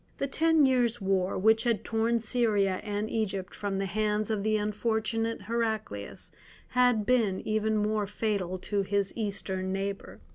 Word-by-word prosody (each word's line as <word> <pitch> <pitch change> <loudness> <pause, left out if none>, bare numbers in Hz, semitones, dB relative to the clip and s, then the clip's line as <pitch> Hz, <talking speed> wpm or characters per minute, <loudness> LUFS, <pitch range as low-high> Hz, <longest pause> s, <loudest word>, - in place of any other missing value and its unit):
The - - -1
ten 320 +2 +3
years' 245 -3 +2
war 190 -1 0
which 220 +3 +4
had 235 -3 0
torn 230 +1 +1
Syria 215 -5 +1
and 210 0 -2
Egypt 195 -5 -2
from 200 -2 -3
the 195 - -1
hands 210 +2 0
of 215 -2 0
the 215 +1 +1
unfortunate 220 +1 -1
Heraclius 220 - -3 0.4
had 245 -4 +3
been 220 -6 +2
even 215 0 +1
more 210 0 0
fatal 200 -3 -2
to 200 +2 -1
his 200 0 0
Eastern 190 -3 -3
neighbour. 195 +1 -4
215 Hz, 150 wpm, -29 LUFS, 195-225 Hz, 0.4 s, which